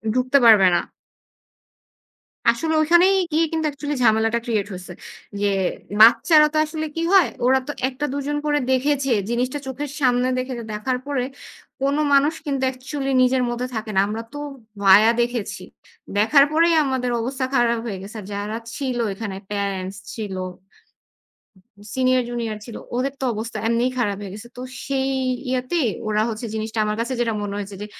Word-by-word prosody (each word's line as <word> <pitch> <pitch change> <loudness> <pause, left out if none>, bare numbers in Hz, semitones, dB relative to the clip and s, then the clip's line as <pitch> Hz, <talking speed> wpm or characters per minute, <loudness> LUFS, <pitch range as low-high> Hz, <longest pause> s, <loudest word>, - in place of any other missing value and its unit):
ঢুকতে 255 +2 +3
পারবে 210 -5 +8
না। - - +3 1.7
আসলে 320 -1 +1
ঐখানেই 345 +5 +5 0.2
গিয়ে 320 +2 +3
কিন্তু 320 -1 0
অ্যাকচুয়ালি 290 0 -4
ঝামেলাটা 225 +1 +3
ক্রিয়েট 215 -4 -1
হয়েছে। 180 -1 -8 0.5
ইয়ে, 205 0 +1 0.5
বাচ্চারা 240 +8 +7
তো - - 0
আসলে 315 0 -4
কি 330 - -2
হয়, 375 -8 +6 0.2
ওরা 265 +1 +4
তো - - -2 0.2
একটা 270 +3 -4
২ - - -2
জন 295 0 -1
করে 295 -1 +2
দেখেছে 270 +1 +1 0.2
জিনিসটা 250 +4 -1
চোখের 270 +2 -5
সামনে 250 -1 +3
দেখেছে, 255 -2 -4
দেখার 230 +5 -1
পরে 280 -3 -1 0.6
কোন 275 +1 +1 0.2
মানুষ 280 +3 +4
কিন্তু 275 -2 -1
অ্যাকচুয়ালি 270 +2 -4
নিজের 255 0 +3
মধ্যে 240 +1 -3
থাকে 220 0 -4
না। - - +4
আমরা 220 +2 -4
তো - - -6 0.5
ভায়া 200 +3 +7
দেখেছি। 240 -3 -3 0.6
দেখার 275 +7 +5
পরেই 335 +2 +4
আমাদের 260 -3 -1
অবস্থা 260 +2 -2
খারাপ 235 -2 +3
হয়ে 205 -5 -4
গেছে। 200 +4 -10
আর - - -11
যারা 205 +2 -3 0.2
ছিল 260 -4 -2 0.2
এখানে 195 -1 -5 0.2
প্যারেন্টস 195 -2 -3 0.2
ছিল। 210 -4 -5 1.6
সিনিয়র 255 -1 +2
জুনিয়র 230 -3 -3
ছিল। 235 - -9 0.2
ওদের 260 +2 -1
তো - - -2
অবস্থা 220 +1 -5
এমনিই 235 +2 +1
খারাপ 205 -5 0
হয়ে 200 -2 -7
গেছে। 215 +3 -10
তো - - -5 0.2
সেই 270 -1 0 0.4
ইয়েতে 255 +6 -1 0.3
ওরা 215 0 +1
হচ্ছে 225 +1 -4
জিনিসটা 220 +1 -4
আমার 210 0 -1
কাছে 240 +3 -2
যেটা 235 -1 +1
মনে 200 -1 -4
হয়েছে 200 0 -6
যে, - - -4
250 Hz, 165 wpm, -22 LUFS, 220-275 Hz, 1.7 s, পারবে